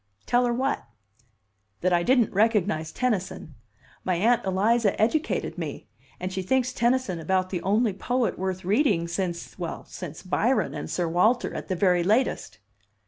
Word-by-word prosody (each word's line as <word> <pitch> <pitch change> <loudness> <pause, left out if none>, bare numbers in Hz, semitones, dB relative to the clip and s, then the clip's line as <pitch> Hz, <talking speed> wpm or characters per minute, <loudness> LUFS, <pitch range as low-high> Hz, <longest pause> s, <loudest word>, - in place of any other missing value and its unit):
"Tell 245 0 +3
her - - +1
what?" 265 +3 -1 1.0
"That 185 0 +2
I 175 - +3
didn't 245 +3 +3
recognize 200 -6 +1
Tennyson. 195 -10 -2 0.5
My 185 - 0
Aunt 230 +7 +3
Eliza 205 +3 +2
educated 290 +9 0
me - - -6 0.3
and 185 +1 -4
she 190 - -2
thinks 255 +6 +1
Tennyson 240 -7 +1
about 185 +3 0
the 180 -3 -2
only 210 +2 +2
poet 245 +5 -1
worth 185 -1 -3
reading 200 - +2
since 170 -1 -4
well, - - -5
since - - -8
Byron - - +1
and 75 +2 -5
Sir 175 - -1
Walter 215 +9 +2
at - - -6
the 185 - -1
very 180 -1 +3
latest!" 210 - 0
195 Hz, 155 wpm, -26 LUFS, 180-240 Hz, 1.0 s, Tell